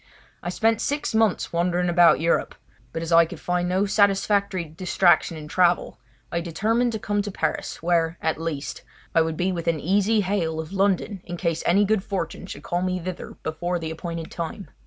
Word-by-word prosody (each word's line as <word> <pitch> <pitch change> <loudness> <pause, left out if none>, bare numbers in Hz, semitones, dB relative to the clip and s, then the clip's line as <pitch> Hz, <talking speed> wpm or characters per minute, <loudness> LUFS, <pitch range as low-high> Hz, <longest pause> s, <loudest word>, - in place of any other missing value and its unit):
I - - -4
spent 225 +4 +1
six 290 -3 -1
months 220 -6 +1
wandering 175 +1 +1
about 175 -1 +5
Europe, 165 +2 +1 0.4
but 165 - -4
as 165 - -5
I 165 0 +7
could 160 - -9
find 180 0 -1
no 190 +3 +2
satisfactory 200 -2 +2
distraction 175 +1 +2
in 150 -1 -8
travel, 175 +2 +2 0.3
I 170 - -1
determined 220 +8 0
to - - -1
come 205 0 0
to 205 - -4
Paris, 190 - -3
where, 165 -1 +1
at 160 0 -1
least, 155 -4 -4 0.3
I 165 - +5
would 160 -1 -1
be 185 +2 +1
within 170 -2 -1
easy 205 +6 +2
hail 180 -5 -1
of 160 +3 -6
London 195 0 0
in 175 0 -6
case 165 -2 -1
any 200 +4 +4
good 210 -1 +1
fortune 185 -2 -4
should 145 -5 -8
call 175 +1 -1
me 185 0 -1
thither 180 +1 -6
before 175 +3 -2
the 160 -2 -4
appointed 165 0 -6
time. 170 +4 -6
175 Hz, 190 wpm, -24 LUFS, 165-195 Hz, 0.4 s, I